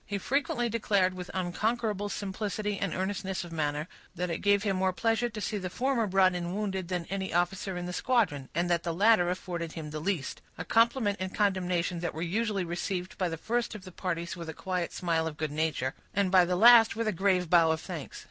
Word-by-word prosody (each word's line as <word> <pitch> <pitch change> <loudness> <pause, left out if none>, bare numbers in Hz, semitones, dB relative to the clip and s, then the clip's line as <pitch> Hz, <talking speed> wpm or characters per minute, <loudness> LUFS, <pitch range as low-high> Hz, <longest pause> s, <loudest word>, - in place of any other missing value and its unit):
He 205 - -3
frequently 240 +2 0
declared, 205 -5 +1
with 180 -1 -7
unconquerable 205 +3 -1
simplicity 205 0 -3
and 200 - -1
earnestness 190 0 -2
of 175 - -10
manner, 150 -1 -1 0.3
that 180 0 -2
it - - -2
gave 200 0 +3
him 195 -3 0
more 190 0 +2
pleasure 225 +5 +1
to 215 -1 -7
see 210 0 -2
the 185 -1 -4
former 245 +1 0
brought 190 -1 +4
in 175 +1 -3
wounded 190 -4 -2
than 180 -2 -2
any 195 -1 -2
officer 180 +2 0
in 175 - -4
the 180 - -5
squadron, 180 - +1
and 170 +1 +1
that 170 -1 +2
the 170 0 -3
latter 200 -2 +4
afforded 175 -2 -4
him 155 -2 -6
the 155 - -4
least; 160 -4 -2 0.2
a 165 - -5
compliment 230 -2 +3
and 185 0 -4
condemnation 180 -4 0
that 170 -2 -3
were 160 - -3
usually 205 +2 0
received 180 +2 -3
by 185 -2 +1
the 165 - -4
first 235 +5 -2
of 205 - -9
the 185 - -10
parties 170 -2 -3
with 170 -2 -7
a 160 - -6
quiet 180 -2 -2
smile 165 -2 0
of 155 -2 -6
good 155 -1 -2
nature, 150 -4 -1 0.2
and 200 -2 +2
by 185 -2 +6
the 180 +1 0
last 230 +3 +7
with 230 0 -1
a - - +3
grave 185 -1 +1
bow 165 -1 +5
of 160 0 +1
thanks. 165 -5 -7
185 Hz, 225 wpm, -29 LUFS, 170-205 Hz, 0.3 s, last